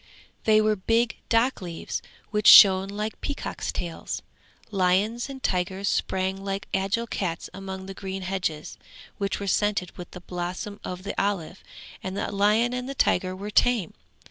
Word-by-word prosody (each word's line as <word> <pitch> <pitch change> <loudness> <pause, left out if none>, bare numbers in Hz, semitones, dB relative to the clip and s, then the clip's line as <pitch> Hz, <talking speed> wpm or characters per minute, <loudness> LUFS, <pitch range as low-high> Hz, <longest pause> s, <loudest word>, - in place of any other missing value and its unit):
They 215 -1 +5
were 215 0 +2
big 230 +5 +1
dock 235 +2 +2
leaves, 170 -2 -5 0.3
which 210 -1 +1
shone 190 -1 +9
like 210 +2 -4
peacocks' 285 - -4
tails. 170 -2 -5 0.5
Lions 200 +6 +1
and 265 -1 -8
tigers 190 +2 -1
sprang 190 0 -1
like 195 0 -3
agile 195 +5 0
cats 180 -7 -3
among 190 -1 -7
the 195 - -7
green 190 0 -5
hedges, 180 -5 -3 0.4
which 200 -1 -1
were 200 - -4
scented 200 -2 0
with 175 - -7
the 180 - -10
blossom 180 +4 -5
of 180 0 -6
the 200 - -4
olive, 195 -3 -2 0.4
and 190 +1 -5
the - - -2
lion 210 +4 +3
and 250 +1 -3
the 275 - -5
tiger 185 -6 +2
were 200 +3 -6
tame. 225 -5 +2
195 Hz, 160 wpm, -26 LUFS, 185-215 Hz, 0.5 s, shone